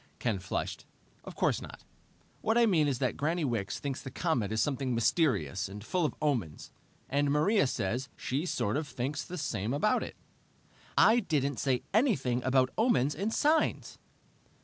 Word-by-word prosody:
Ken 110 -5 -1
flushed. 95 - -4 0.4
"Of - - -9
course - - +1
not. - - -10 0.6
What 225 +2 +1
I 240 - +6
mean 165 -9 +3
is 135 -3 0
that 130 -1 -1
Granny 160 +2 0
Wicks 115 -7 -2
thinks 140 -2 -4
the 135 - -7
comet 130 - -1
is 110 - 0
something 135 -2 0
mysterious 105 - +1
and 100 +1 -8
full 175 +7 0
of - - -2
omens, 120 - -2 0.4
and 145 +1 +1
Maria 155 +5 +3
says 120 +3 -2
she 145 +7 -2
sort 105 -6 0
of 155 -1 -3
thinks 130 +2 -3
the 180 - -7
same 115 -6 -2
about 210 +9 +2
it." - - -6 0.8
"I 230 +2 +6
didn't 140 - -1
say 130 -3 0
anything 135 - +2
about 130 0 +3
omens 210 - +3
and 200 +7 -2
signs!" 305 +5 +1
140 Hz, 170 wpm, -30 LUFS, 120-165 Hz, 0.8 s, I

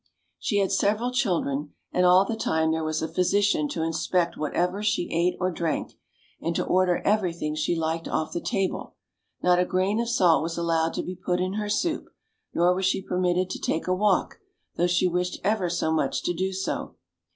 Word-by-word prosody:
She 205 - 0
had 195 -1 +2
sev 200 +2 +2
eral 245 +3 -3
children, 165 - -1 0.2
and 180 0 +3
all 185 +2 +6
the 225 - -2
time 160 -7 +1
there 160 0 -1
was 155 0 -1
a - - 0
physician 185 -3 +2
to 160 - -2
inspect 170 +2 0
whatever 180 +6 -1
she 210 -4 0
ate 175 +2 +1
or 185 0 0
drank, 165 -2 -2 0.5
and 165 0 -2
to - - 0
order 180 -1 +2
every 205 -3 +2
thing 150 -2 -3
she 155 +3 0
liked 165 0 -2
off 155 - -1
the 170 - -2
table; 195 -2 -2 0.5
not 180 0 +4
a - - +4
grain 185 +4 0
of 235 - -2
salt 180 -8 +4
was 165 +1 -3
allowed 165 -1 0
to - - -2
be 185 - -5
put 180 0 -1
in 185 +1 -1
her 210 0 -3
soup, 315 +10 -1 0.4
nor 175 +1 +3
was 190 +1 0
she 190 - +1
permitted 180 -1 0
to - - -4
take 160 - -1
a 185 - +1
walk, 195 0 +1 0.4
though 175 - +2
she 180 +1 +2
wished 180 +1 -1
ever 200 -2 +1
so 170 -2 0
much 155 -4 0
to 175 - 0
do 190 +3 -1
so. 190 0 -3
180 Hz, 205 wpm, -26 LUFS, 165-190 Hz, 0.5 s, all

